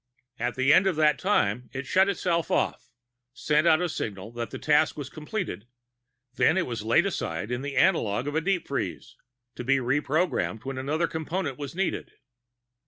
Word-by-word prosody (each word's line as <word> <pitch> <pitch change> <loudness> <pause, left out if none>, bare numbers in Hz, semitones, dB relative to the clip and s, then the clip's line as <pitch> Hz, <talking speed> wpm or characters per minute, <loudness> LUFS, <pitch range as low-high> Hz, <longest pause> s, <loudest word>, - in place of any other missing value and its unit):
At 120 +1 -1
the 135 +2 +4
end 195 - +5
of 185 - +1
that 150 -3 +3
time, 125 - +1
it 135 +1 -4
shut 190 +7 +3
itself 175 -3 0
off, - - -1 0.4
sent 150 +4 +1
out 160 +1 +5
a - - +1
signal 105 - -5
that 120 -1 -5
the - - -6
task 155 +1 +2
was 140 -2 -6
completed, 155 - -5 0.7
then 160 +6 +3
it 185 - +1
was 120 -3 -4
laid 115 - +3
aside 100 - -3
in 125 +1 -2
the 140 0 -5
analogue 125 - +2
of 145 - -2
a 160 - +1
deep 180 0 0
freeze, - - -4 0.4
to - - -6
be 135 +2 +3
reprogrammed 135 - 0
when 135 -1 -4
another 155 +5 0
Component 160 -3 -3
was 145 +2 -6
needed. 195 +1 -2
145 Hz, 180 wpm, -27 LUFS, 125-170 Hz, 0.7 s, end